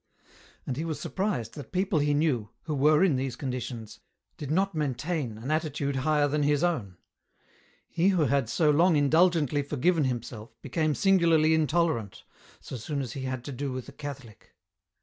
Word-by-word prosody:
And 130 - -3
he 155 - -2
was 160 -3 -4
surprised 185 - -2
that 145 - -9
people 185 -3 +1
he 145 0 +2
knew, 140 -9 0
who 155 - -3
were 150 +4 +4
in 165 -9 +3
these 130 -2 -3
conditions, 125 -4 -5 0.4
did 145 - -7
not 190 +5 +1
maintain 150 -4 -2
an 120 +7 -5
attitude 150 -3 -1
higher 145 +2 +2
than 150 +1 0
his 145 +1 +2
own. 120 - -1 0.9
He 175 +2 +1
who 185 -5 +3
had 140 -5 +1
so 150 +5 +3
long 165 +3 +4
indulgently 150 -1 +3
forgiven 150 +3 +1
himself 115 -2 -5
became 155 +2 0
singularly 165 -5 +4
intolerant, 155 - 0 0.4
so 130 - -7
soon 140 +6 -4
as 130 -4 -4
he 135 -1 -5
had 130 -2 -4
to 145 - -6
do 140 +1 -4
with 130 -1 -6
a - - -13
Catholic. 140 -6 -10
145 Hz, 170 wpm, -28 LUFS, 130-160 Hz, 0.9 s, were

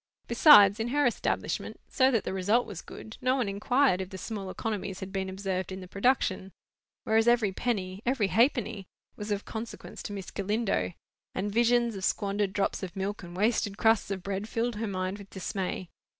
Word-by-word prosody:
Besides, 230 - +7
in 225 - -1
her 290 +4 +2
establishment, 240 - -1
so 260 -1 +3
that 230 -6 +1
the - - -3
result 205 +6 +2
was 200 -6 -7
good, 220 - -10
no 255 +1 +2
one 250 -5 0
inquired 205 +1 +2
if 185 - -5
the 190 - -8
small 200 -1 -5
economies 195 -2 -4
had 190 -1 -6
been 190 -1 -2
observed 190 -1 -3
in 190 - -5
the 185 - -9
production. 200 -3 0 0.5
Whereas 225 +1 +2
every 235 -4 +4
penny—every 205 +1 -1
halfpenny, 225 -5 +1 0.3
was 210 +1 -6
of 205 -1 -2
consequence 225 0 -7
to 205 - -6
Miss 195 -2 -6
Galindo; 205 -1 -1 0.4
and 205 +2 -2
visions 235 0 +3
of 190 - -6
squandered 200 0 0
drops 200 0 -1
of 190 -1 -6
milk 195 +2 -3
and 175 -1 -9
wasted 210 -1 +1
crusts 225 -3 +3
of 190 -2 -4
bread 200 +2 -3
filled 230 -1 -1
her 225 +1 -2
mind 185 0 -3
with 200 -1 -12
dismay. 190 -1 -4
205 Hz, 185 wpm, -29 LUFS, 190-230 Hz, 0.5 s, Besides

